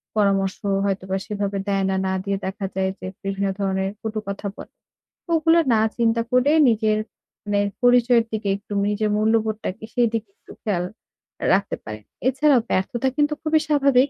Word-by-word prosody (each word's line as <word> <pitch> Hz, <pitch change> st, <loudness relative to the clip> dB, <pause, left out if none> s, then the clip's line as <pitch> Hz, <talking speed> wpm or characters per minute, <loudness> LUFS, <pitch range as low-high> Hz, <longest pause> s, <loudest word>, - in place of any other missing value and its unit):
পরামর্শ 195 Hz, -2 st, +2 dB, 0.3 s
হয়তোবা 190 Hz, -1 st, -1 dB
সেভাবে 200 Hz, -2 st, -2 dB
দেয় 195 Hz, -1 st, +1 dB
না। 190 Hz, -, 0 dB
না 190 Hz, -, 0 dB
দিয়ে 200 Hz, 0 st, -1 dB
দেখা 195 Hz, +1 st, -4 dB
যায় 190 Hz, 0 st, +1 dB
যে, -, -, -8 dB, 0.2 s
বিভিন্ন 195 Hz, 0 st, -1 dB
ধরনের 190 Hz, -1 st, 0 dB
কটু 220 Hz, -1 st, -3 dB
কথা 200 Hz, +1 st, -4 dB
বলে। -, -, -11 dB, 0.6 s
ও -, -, -2 dB
ওগুলো 325 Hz, +1 st, +4 dB
না 220 Hz, -, +4 dB, 0.2 s
চিন্তা 230 Hz, -1 st, +2 dB
করে 250 Hz, +3 st, +4 dB, 0.2 s
নিজের 215 Hz, -1 st, +2 dB, 0.5 s
মানে 205 Hz, -1 st, +1 dB, 0.2 s
পরিচয়ের 245 Hz, -1 st, +5 dB
দিকে, 215 Hz, -2 st, -2 dB
একটু 205 Hz, +1 st, -9 dB
নিজের 210 Hz, +1 st, 0 dB
মূল্যবোধটাকে, 220 Hz, -2 st, 0 dB
সেই 240 Hz, -1 st, +3 dB
দিকে 220 Hz, -2 st, -2 dB
একটু -, -, -16 dB
খেয়াল 190 Hz, -5 st, 0 dB, 0.6 s
আ -, -, 0 dB
রাখা 195 Hz, +1 st, +1 dB
যায়। 110 Hz, 0 st, -6 dB, 0.3 s
এছাড়াও, 270 Hz, +1 st, +4 dB
ব্যর্থতা 230 Hz, +7 st, 0 dB
কিন্তু 295 Hz, 0 st, +2 dB
খুবই 315 Hz, 0 st, +3 dB
স্বাভাবিক। 280 Hz, -3 st, +4 dB
215 Hz, 165 wpm, -23 LUFS, 195-245 Hz, 0.6 s, পরিচয়ের